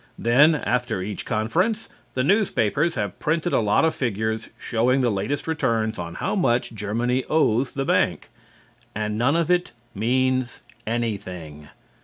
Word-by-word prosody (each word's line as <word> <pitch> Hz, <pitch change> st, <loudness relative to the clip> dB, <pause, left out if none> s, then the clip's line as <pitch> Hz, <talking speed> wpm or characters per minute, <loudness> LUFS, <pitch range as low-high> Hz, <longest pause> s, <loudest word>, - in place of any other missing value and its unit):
Then, 140 Hz, +8 st, +5 dB
after 125 Hz, -8 st, -1 dB
each 100 Hz, 0 st, -5 dB
conference, 170 Hz, -, 0 dB, 0.3 s
the 130 Hz, -, +1 dB
newspapers 165 Hz, -, +2 dB
have 105 Hz, -3 st, -3 dB
printed 165 Hz, +3 st, 0 dB
a -, -, +4 dB
lot 105 Hz, +7 st, +3 dB
of 160 Hz, -, +2 dB
figures 110 Hz, -2 st, -2 dB
showing 125 Hz, +3 st, +1 dB
the 120 Hz, -2 st, +2 dB
latest 105 Hz, +11 st, -2 dB
returns 115 Hz, -, 0 dB
on 85 Hz, -1 st, -5 dB
how -, -, -2 dB
much 125 Hz, -, +1 dB
Germany 115 Hz, +5 st, -1 dB
owes 135 Hz, -5 st, +2 dB
the 135 Hz, 0 st, -2 dB
bank. -, -, +1 dB, 0.6 s
And 105 Hz, 0 st, -2 dB
none 125 Hz, +7 st, +2 dB
of 170 Hz, 0 st, +1 dB
it 180 Hz, -7 st, +1 dB, 0.2 s
means 130 Hz, +3 st, 0 dB, 0.2 s
anything. 95 Hz, -10 st, -4 dB
120 Hz, 145 wpm, -23 LUFS, 110-145 Hz, 0.6 s, Then